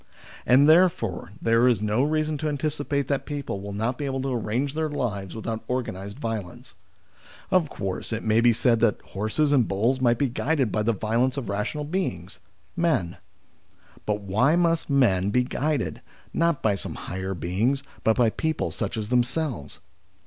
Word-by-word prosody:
And, 135 +4 +6
therefore, 155 - +3
there 115 +2 +3
is 120 -5 +3
no 105 +3 +1
reason 155 +1 +1
to 155 - -1
anticipate 145 -1 -1
that 140 -1 -1
people 140 -9 -4
will 100 +1 -6
not 110 +5 -2
be 145 - -2
able 135 -1 -2
to 135 -1 -1
arrange 120 +4 -1
their 155 0 -1
lives 105 -10 -3
without 110 0 -4
organised 100 -5 -3
violence. 110 -9 -5 0.8
Of 175 -5 +3
course, 95 -2 -4
it 110 - -3
may 110 +1 +3
be 120 0 +6
said 115 0 +2
that 115 -3 +2
horses 110 +9 -1
and 130 -6 +4
bulls 115 +7 +1
must 120 -2 +3
be 140 - +1
guided 135 0 0
by 110 - 0
the 110 +2 +2
violence 115 +5 0
of 125 -7 -4
rational 105 +9 -2
beings 95 - -3 0.4
men; 160 - 0 0.9
but 105 0 0
why 110 - +2
must 170 -2 +1
men 100 -9 +3
be 125 +4 +2
guided, 130 - -2 0.3
not 170 -3 +1
by 110 - +3
some 100 - -5
higher 95 +1 -4
beings, 105 - 0 0.2
but 110 - +3
by 120 -3 +4
people 160 +4 -2
such - - -3
as 105 -1 -3
them 125 0 +4
selves 125 - -4
120 Hz, 175 wpm, -25 LUFS, 105-145 Hz, 0.9 s, And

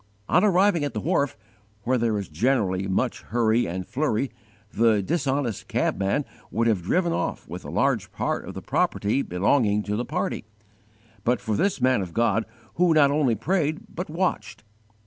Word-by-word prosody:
On - - +4
arriving 195 -4 +3
at 140 -5 -3
the - - 0
wharf, 140 - 0 0.5
where 125 +2 +1
there 115 -2 +1
is 100 -3 -4
generally 95 - 0
much 95 - -1
hurry 115 0 +1
and 90 +2 -4
flurry, 135 -1 -1 0.4
the 110 -3 +3
dishonest 135 - -1
cabman 100 +9 0 0.2
would 115 +1 0
have 110 -6 +2
driven 170 - +1
off - - -3
with - - -7
a - - -8
large - - 0
part - - -2
of - - -7
the - - -7
property 105 +7 +1
belonging 105 +3 +1
to 105 0 -2
the 120 - -1
party, - - -2 0.8
but 120 0 +2
for 110 - -2
this 195 - +1
man 130 -3 +3
of 90 -3 -6
God 115 -1 +2 0.3
who 175 -2 +4
not 140 -2 +5
only 140 -6 +2
prayed 155 - 0
but 180 +3 -4
_watched. 130 - -2
120 Hz, 170 wpm, -25 LUFS, 105-150 Hz, 0.8 s, not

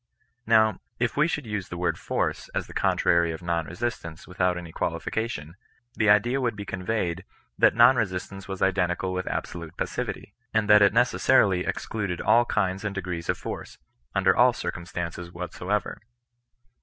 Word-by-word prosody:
Kow, 110 -1 +4 0.2
if 120 0 -1
we 150 +3 +3
should 150 -5 -3
use 105 -4 -4
the 90 - -6
MTord 90 0 0
force - - -2
as - - -1
the - - -12
contrary 85 -1 +2
of 80 - -7
nonr^esistance 85 +1 -3
without 90 0 0
any 85 -2 -8
qualification, 85 -5 -3 0.4
the 110 -3 +1
idea 120 +6 +4
would 120 -3 0
be 100 0 -6
conveyed 95 -2 -2 0.4
that - - +5
non 120 +2 +7
resiMance 95 -2 -3
was 95 -1 -3
identical 95 -1 +1
with 90 0 -3
ahsolvie 85 -2 -5
pasnvity) - - -4 0.2
and 110 -1 +2
that 105 0 +7
it 100 - +6
necessarily 115 -5 +3
excluded 100 -6 -3
all 120 +1 +4
kinds 95 -3 -1
and 100 -2 -3
degrees 90 -3 -4
of - - +1
force, - - -7 0.4
under 95 -1 +4
all 125 0 +5
circumstances 85 -3 -5
whatsoever. 90 +3 -3
95 Hz, 155 wpm, -26 LUFS, 90-110 Hz, 0.4 s, non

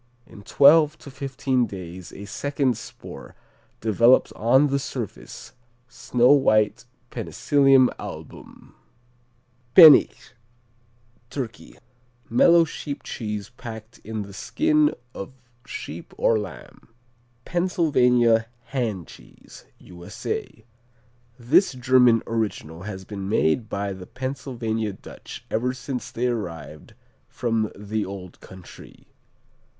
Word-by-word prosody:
In 100 - -14
twelve 150 +7 +5
to 140 - -12
fifteen 130 -2 -1
days 90 -3 -9
a 100 - -9
second 135 +1 -1
spore - - -11 0.5
develops 115 +4 +4
on 130 +6 +3
the 140 -1 0
surface, 130 -6 -7 0.3
snow 120 +1 +2
white 110 -7 +3 0.3
Penicillium 135 -3 +3
Album. - - -10 1.0
Pennich 160 -6 +8 1.0
Turkey 125 -5 -7 0.5
Mellow 170 +8 +5
sheep 145 -2 -7
cheese 105 -2 -5
packed 115 -1 -9
in 110 -1 -5
the 100 0 -12
skin 305 - +1 0.2
of 100 +7 -8 0.3
sheep - - -8
or 110 - +2
lamb. 100 -4 -10 0.6
Pennsylvania 125 -10 +2 0.3
Hand 110 -10 -2
Cheese - - -16
U.S.A. 90 +4 -7 0.7
This 140 +9 +3
German 125 -2 +4
original 105 -8 -3
has 95 -2 -8
been 100 -1 -6
made 110 +3 +1
by 100 0 -3
the 95 -1 -10
Pennsylvania 120 -5 -4
Dutch - - -11
ever 125 +3 -1
since 125 -2 -5
they 120 - -3
arrived 85 -10 -5 0.3
from 115 -3 -1
the 105 +1 -3
old 95 -2 -9
country. 95 -2 -14
115 Hz, 105 wpm, -24 LUFS, 105-135 Hz, 1.0 s, Pennich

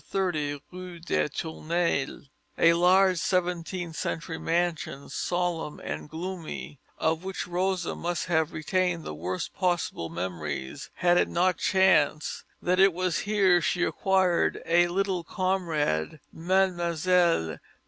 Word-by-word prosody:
30 155 -7 -1
Rue 180 -1 -8
des 165 -2 0
Tournelles, 160 -2 -2 0.3
a 165 0 +6
large 185 +1 +4
seventeenth 175 -2 -1
century 165 +1 -3
mansion, 165 -4 -1
solemn 175 -4 -2
and - - -6
gloomy, 165 -4 -6 0.2
of 160 +2 0
which 190 0 -4
Rosa 180 0 -1
must 175 +1 -2
have 160 -2 +1
retained 180 +2 0
the - - -5
worst 90 +4 -4
possible 175 - -1
memories 80 -6 -5
had 175 0 +3
it - - +2
not 180 +1 +1
chanced 170 -6 +2 0.2
that 180 +1 +2
it 195 -1 +6
was 180 -2 0
here 190 -4 +4
she 175 +2 0
acquired 190 -3 +2
a 175 +1 +4
little 185 0 -1
comrade, 165 - -1
Mlle. 175 - +1
175 Hz, 120 wpm, -27 LUFS, 155-185 Hz, 0.3 s, a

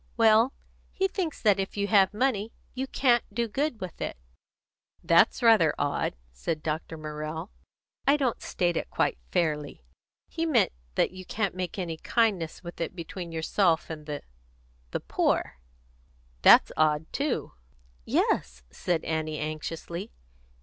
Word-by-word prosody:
"Well, 225 +2 +5 0.4
he 385 - +1
thinks 365 -6 -3
that 205 -3 +4
if 195 +1 -3
you 200 - +1
have 200 -2 +5
money, 220 -2 0 0.2
you 265 +1 -3
can't 245 -3 +3
do 235 +3 -1
good 270 +2 -1
with 185 -4 -7
it." - - -3 0.9
"That's 170 +9 +4
rather 215 -10 +6
odd," 145 - -1 0.2
said 150 - -3
Dr. 160 +1 -3
Morrell. 155 +3 -5 0.6
"I 280 +2 +6
don't 260 -5 0
state 175 -1 0
it - - -2
quite - - 0
fairly. 150 - -1 0.4
He 330 - -3
meant 295 -7 +3 0.2
that - - +2
you 185 0 -9
can't 200 +1 -1
make 185 +1 -4
any 170 -4 -3
kindness 195 -5 0
with 175 0 -8
it 165 - -3
between 170 0 -6
yourself 165 +1 +1
and 155 -1 -8
the 145 -1 -4 0.7
the - - -3
poor." - - 0 0.8
"That's - - +8
odd 155 0 +2
too." 280 -2 -1 0.5
"Yes," - - 0
said 170 -3 -1
Annie 155 -1 -2
anxiously. 165 +5 -5
180 Hz, 145 wpm, -28 LUFS, 155-225 Hz, 0.9 s, That's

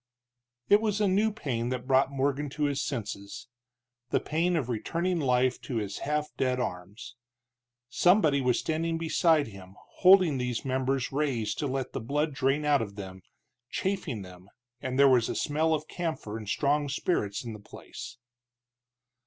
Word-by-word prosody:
It 205 +1 +5
was 210 -2 0
a 210 - +3
new 205 +4 +2
pain 125 - -3
that 125 -1 -3
brought 135 +1 +3
Morgan 140 +1 -1
to 150 - 0
his 140 -1 0
senses, 105 -3 -5 0.6
the - - +2
pain 170 +3 0
of 145 -7 0
returning 170 +9 -1
life 130 -2 +1
to 125 - -5
his 105 -3 -3
half 150 +1 -1
dead 130 -1 +1
arms. 100 +2 -5 0.7
Somebody 155 - +3
was 125 -2 +2
standing 165 +1 -1
beside 165 -1 +3
him 95 -2 -13 0.2
holding 180 -7 +6
these 125 -1 -2
members 130 0 0
raised 135 -7 -1
to 145 - 0
let 135 -1 -3
the - - -3
blood 145 +6 -1
drain 135 +3 +1
out 145 -3 +3
of 100 -3 -5
them, 95 -2 -8 0.5
chafing 180 - -2
them, 90 +1 -13 0.3
and 130 0 -3
there 140 0 +7
was 125 -3 +4
a - - -2
smell 155 +2 +1
of 155 0 -1
camphor 160 -11 -4
and 110 -2 -6
strong 145 +4 +1
spirits 130 - -1
in 115 - -5
the 105 - -9
place. 120 +3 -10
135 Hz, 165 wpm, -28 LUFS, 120-155 Hz, 0.7 s, there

